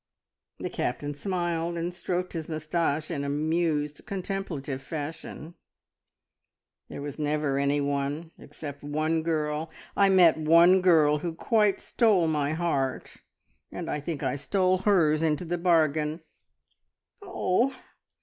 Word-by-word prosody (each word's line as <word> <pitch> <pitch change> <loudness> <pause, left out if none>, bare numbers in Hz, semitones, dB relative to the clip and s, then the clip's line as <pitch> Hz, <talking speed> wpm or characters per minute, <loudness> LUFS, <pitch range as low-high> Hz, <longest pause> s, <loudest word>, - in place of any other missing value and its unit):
The - - -5
Captain 145 +4 -2
smiled 170 0 -2
and 170 +1 -3
stroked 180 0 -3
his 165 -2 -5
moustache 155 0 -1
in 145 -4 -2
amused, 150 0 -1
contemplative 180 -9 -4
fashion. 155 +2 -7 1.4
"There - - -7
was 145 +1 -6
never 150 -2 0
anyone, 140 +2 -1
except 145 -1 -9
one 155 +2 0
girl! 155 -1 -1 0.3
I 200 -1 +4
met 180 -4 +6
one 170 +4 +6
girl 155 -5 +4
who 165 +1 -4
quite 210 +2 +2
stole 210 -8 +2
my 150 -1 0
heart, 140 -6 -2 0.5
and - - -5
I 150 - -1
think 150 0 -5
I 145 - -1
stole 185 +5 +1
hers 170 -6 +3
into 160 +1 0
the 175 +1 -2
bargain." 155 -2 +2 1.0
"Oh! 265 - 0
160 Hz, 120 wpm, -27 LUFS, 150-175 Hz, 1.4 s, met